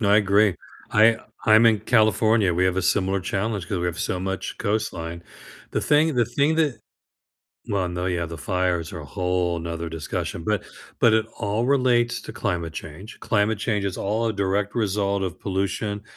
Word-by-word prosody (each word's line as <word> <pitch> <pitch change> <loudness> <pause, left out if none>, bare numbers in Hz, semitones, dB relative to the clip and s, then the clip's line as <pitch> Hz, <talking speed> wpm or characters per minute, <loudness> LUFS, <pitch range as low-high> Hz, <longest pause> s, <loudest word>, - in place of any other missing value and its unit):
No, 100 -3 +2
I 105 - +6
agree. 100 -1 +4 0.4
I 110 +1 +5 0.3
I'm 110 +1 +6
in 110 -2 +4
California, 110 -4 +3
we 90 +2 +2
have 95 0 +1
a 95 - +1
similar 95 +1 +1
challenge 100 0 -2
'cause 100 -5 -1
we 90 - -1
have 85 -1 -3
so 90 - -2
much 95 0 -4
coastline. 85 -6 -2 0.5
The - - 0
thing 150 +1 +3
the 120 -2 +3
thing 140 +7 +1
that 145 -8 +1 0.9
Well, 95 -3 0
no, 90 +1 -3
yeah, 85 -2 -1
the 85 -1 -8
fires 90 -4 -1
are 85 - -6
whole 90 +1 -1
'nother 85 0 -4
discussion, 80 +1 -4
but 105 -2 0 0.4
but 115 - +5
it 110 0 +2
all 110 +3 -1
relates 125 -3 +2
to - - -8
climate 85 -6 -2
change, 80 +7 -9
climate 105 0 +1
change 105 -2 -1
is 95 -2 -2
all 110 +3 -1
a 110 - -1
direct 100 0 -1
result 100 -2 0
of 90 - -5
pollution 100 +2 -2
100 Hz, 180 wpm, -24 LUFS, 90-110 Hz, 0.9 s, I